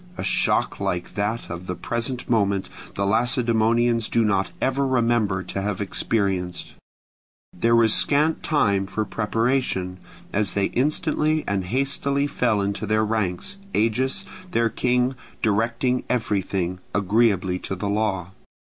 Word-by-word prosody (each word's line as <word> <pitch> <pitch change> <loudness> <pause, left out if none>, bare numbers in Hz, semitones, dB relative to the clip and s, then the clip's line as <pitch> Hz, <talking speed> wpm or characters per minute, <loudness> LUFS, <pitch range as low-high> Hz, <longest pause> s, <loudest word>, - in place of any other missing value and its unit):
A - - -4
shock - - +2
like 90 0 -2
that 105 +3 -2
of 85 +2 -6
the 90 - -3
present 120 +7 -3
moment 100 -5 +1 0.3
the 100 - 0
Lacedaemonians 115 +1 +2
do 115 -1 +2
not 100 -2 +1
ever 135 +1 +1
remember 115 -7 +1
to 95 +2 -4
have 100 -1 -2
experienced: 95 -3 -1 0.8
there 115 +6 +2
was 115 -2 +5
scant 150 +3 +3
time 100 - +1
for 105 +2 -2
preparation, 105 -4 -1 0.3
as 105 -1 +1
they 100 -1 +2
instantly 155 +3 +1
and 100 -2 -1
hastily 140 +5 0
fell 120 -7 +1
into 100 +1 -2
their 110 +1 +2
ranks, 110 - -2 0.2
Agis, 130 - +1 0.2
their 115 -6 +1
king, 125 +2 +1 0.3
directing 115 +4 +1
everything, 95 -6 -1 0.2
agreeably 100 -2 +2
to 95 - -4
the 100 +2 -4
law. 100 -4 -1
110 Hz, 130 wpm, -23 LUFS, 100-125 Hz, 0.8 s, was